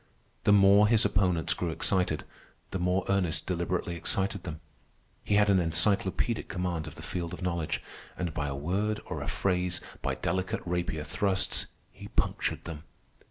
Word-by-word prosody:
The - - +6
more 100 +1 +7
his 110 -1 +4
opponents 90 -4 +2
grew 90 - -2
excited, 90 -1 +1 0.5
the 95 - -2
more 90 +1 +1
Ernest 95 -5 +1
deliberately 85 0 -1
excited 95 +4 -1
them. 80 -3 -5 0.6
He 105 - +1
had 105 0 +5
an 100 -2 +5
encyclopaedic 95 +6 +1
command 90 -4 -2
of 75 - -8
the - - -10
field 85 -1 -4
of 90 - -9
knowledge, 85 -3 -1 0.3
and 90 -3 -2
by 75 -3 -2
a 70 - -3
word 100 +9 -1
or - - -4
a - - -4
phrase, 90 -2 0 0.2
by - - -1
delicate 95 0 -1
rapier 85 -3 -1
thrusts, 95 +5 +1 0.2
he - - -10
punctured - - -1
them. 80 -3 -6
90 Hz, 160 wpm, -29 LUFS, 85-100 Hz, 0.6 s, more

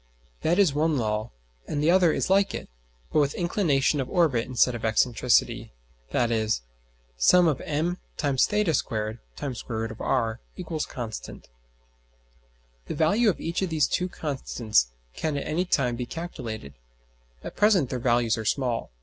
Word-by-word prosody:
That 170 +3 +2
is 195 -8 +4
one 155 +1 +1
law, 110 -1 -1 0.4
and 145 - -2
the 165 - +4
other 180 -2 +5
is - - -1
like 195 +1 +3
it, - - -6 0.5
but - - +4
with 145 -1 +1
inclination 155 -6 +1
of 130 - -5
orbit 150 -10 +2
instead 125 0 +3
of 120 - -5
excentricity, 115 - +2 0.4
viz.: 110 - +1 0.6
[Sigma](m[theta]^2 160 - +2
[square 110 -2 -2 0.5
root]r) 115 +1 -1 0.2
= 160 -2 -3
constant. 115 -3 -7 1.4
The - - -4
value 205 +10 +3
of 195 - -1
each 170 +3 -2
of 190 - 0
these 155 -3 +2
two 180 +1 -1
constants 125 - 0 0.3
can 155 -2 -2
at 140 - -3
any 175 +4 0
time 125 -8 +1
be 120 0 -4
calculated. 115 - -6 0.7
At - - -7
present 195 - +3
their 125 - -2
values 120 -1 +2
are 110 - -5
small. 120 0 -1
140 Hz, 140 wpm, -26 LUFS, 115-170 Hz, 1.4 s, other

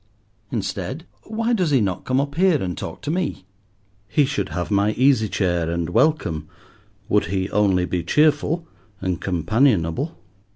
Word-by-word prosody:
Instead, 110 - -3 0.2
why 230 +2 -1
does 185 -8 +1
he 140 -3 +4
not 95 -5 -1
come 130 +1 +1
up 140 0 -1
here 175 -1 +3
and 90 -2 -3
talk 80 - -7
to 150 - -2
me? 170 - -2 0.6
He 145 +4 +3
should 145 +2 -2
have 90 +3 -4
my 100 +1 +2
easy 130 -4 +3
chair 85 -5 0
and 85 0 -2
welcome, 115 - +1 0.6
would 105 -2 +2
he 95 +2 -2
only 95 -4 +2
be 90 -1 -2
cheerful 155 - +2 0.3
and 95 -2 -2
companionable. 100 - +1
110 Hz, 155 wpm, -22 LUFS, 90-150 Hz, 0.6 s, he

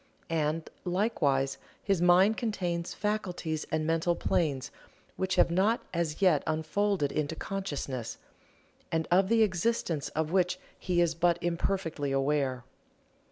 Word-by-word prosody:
And, 160 0 0 0.2
likewise, 150 - +1 0.2
his 195 -4 +1
mind 180 +5 +5
contains 180 -7 -2
faculties 180 -6 -2
and 155 0 0
mental 165 +2 +1
planes 140 -8 0 0.4
which 190 0 -1
have 175 - +4
not 200 +6 +2
as 170 +1 -1
yet 170 -7 +5
unfolded 160 0 0
into 155 +1 -2
consciousness, 145 - -4 0.7
and 160 0 0
of 190 +2 +4
the 225 -1 +5
existence 185 - 0
of 160 0 -1
which 180 -1 +2 0.2
he 175 -1 +1
is 170 -1 +2
but 170 +1 +2
imperfectly 170 -4 -1
aware. 135 -2 0
170 Hz, 125 wpm, -29 LUFS, 155-190 Hz, 0.7 s, mind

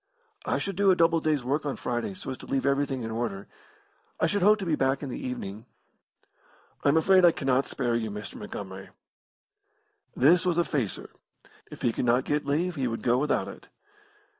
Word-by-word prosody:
"I - - +1
should 195 -2 -3
do 200 -1 +4
a 185 - +6
double 165 -1 +3
day's 155 -4 0
work 140 +5 -1
on 145 -2 -2
Friday 120 +10 -3
so 185 -8 -6
as 130 - -5
to - - -11
leave 135 -1 -1
everything 140 -2 0
in 115 - -4
order. 110 -4 -3 0.7
I - - +3
should 205 -1 0
hope 210 +3 +6
to 195 - -5
be 165 - 0
back 135 -1 +1
in 140 - -4
the 125 - -5
evening." 110 -2 -6 1.2
"I - - +4
am 150 - +4
afraid 185 +3 +5
I 175 - +8
cannot 135 -3 0
spare 120 -3 -1
you, 110 -2 -1
Mr. 105 0 -7
Montgomery." 95 -2 -8 1.3
This 165 +7 +5
was 175 -2 +1
a 175 - +4
facer. 130 - -3 0.6
If - - -11
he 120 - +2
could - - -2
not 125 +2 +3
get 150 0 -1
leave 170 +6 0
he 130 -2 0
would 115 -1 -4
go 120 +1 +3
without 150 +1 0
it. - - -11
135 Hz, 205 wpm, -27 LUFS, 120-165 Hz, 1.3 s, I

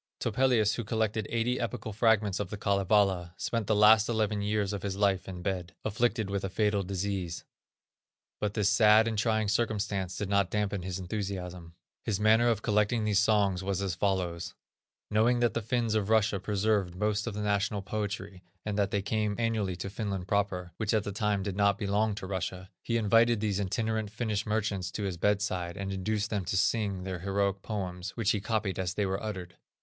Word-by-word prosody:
Topelius, 115 -2 +2
who 120 - -2
collected 110 0 -1
eighty 120 +2 0
epical 110 -1 -4
fragments 110 -3 +2
of 100 -3 -3
the 105 - -5
Kalevala, 100 -3 +2
spent 115 -4 -2
the 110 - +2
last 110 +1 +6
eleven 110 -2 0
years 105 -1 0
of 100 - -4
his 100 -1 -3
life 100 -2 +1
in 90 -1 -7
bed, 90 -3 -3
afflicted 110 0 0
with 100 0 -2
a 95 - -2
fatal 105 +1 +1
disease. 95 -2 -3 1.0
But 105 -1 -2
this 105 -3 +2
sad 110 +1 +6
and 115 - -1
trying 110 0 +1
circumstance 105 -4 -1
did 105 - -2
not 100 -1 +2
dampen 105 -2 -1
his 90 0 -4
enthusiasm. 90 -3 -5 0.3
His 105 -3 -1
manner 110 +3 +4
of 110 -2 0
collecting 105 +1 +2
these 105 -2 +3
songs 100 -3 +2
was 100 -1 -1
as 95 -2 -1
follows: 90 -2 -1 0.6
Knowing 115 +3 +3
that 120 -1 +2
the 115 - -1
Finns 115 0 0
of 105 -2 0
Russia 110 -2 +3
preserved 100 -2 0
most 105 +2 0
of 110 - -3
the 105 - -3
national 100 0 0
poetry, 100 -2 -4 0.2
and 105 -1 -2
that 100 -1 +2
they 100 0 -1
came 105 0 0
annually 110 -5 0
to 90 +3 -5
Finland 100 -2 -4
proper, 95 -3 -1
which 110 0 0
at 110 - +2
that 100 - -4
time 105 -1 0
did 100 -2 -3
not 100 -1 +3
belong 105 +1 0
to 100 - -6
Russia, 95 0 -4
he 115 - 0
invited 115 +1 +4
these 105 -2 0
itinerant 110 +2 -1
Finnish 110 -1 -2
merchants 105 -4 -1
to 105 - -5
his 95 -3 -2
bedside, 95 -2 0
and 100 0 -3
induced 105 +3 -2
them 100 -3 -1
to 95 +2 -1
sing 100 -2 +1
their 95 -1 -4
heroic 100 +1 0
poems, 90 -3 -5
which 115 -2 +2
he 105 - -1
copied 105 -3 -1
as 90 -1 -2
they 105 - +1
were 95 0 -2
uttered. 95 -5 -6
100 Hz, 195 wpm, -29 LUFS, 95-110 Hz, 1.0 s, last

